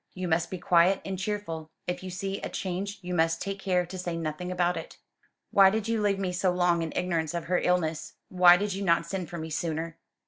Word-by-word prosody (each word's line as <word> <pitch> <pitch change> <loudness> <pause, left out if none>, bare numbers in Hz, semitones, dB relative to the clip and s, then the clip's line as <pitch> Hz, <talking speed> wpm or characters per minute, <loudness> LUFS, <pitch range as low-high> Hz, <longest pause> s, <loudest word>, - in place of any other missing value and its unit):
You 185 -1 -3
must 170 0 +1
be 185 - -4
quiet 175 +2 +4
and 190 -1 -4
cheerful. 190 -6 -4 0.2
If 180 - -3
you 185 - -6
see 195 +2 -4
a - - -4
change 195 +2 -4
you 180 0 -4
must 165 -1 +2
take 195 0 -4
care 180 -2 +1
to 180 +2 -8
say 175 -2 -3
nothing 165 +2 -4
about 180 -1 +1
it." - - -7 0.5
"Why 195 -1 +7
did 220 +1 -2
you 225 -1 0
leave 205 -1 +2
me 190 -2 -2
so 180 +1 +1
long 175 -1 +2
in 165 -1 -3
ignorance 165 -3 -1
of 170 - -3
her 180 0 +1
illness? 165 -3 0
Why 180 -1 +7
did 205 +1 -2
you 195 +1 -3
not 170 -2 +3
send 180 -1 -4
for 170 - -6
me 160 0 -6
sooner?" 165 +1 -3
180 Hz, 235 wpm, -28 LUFS, 170-190 Hz, 0.5 s, Why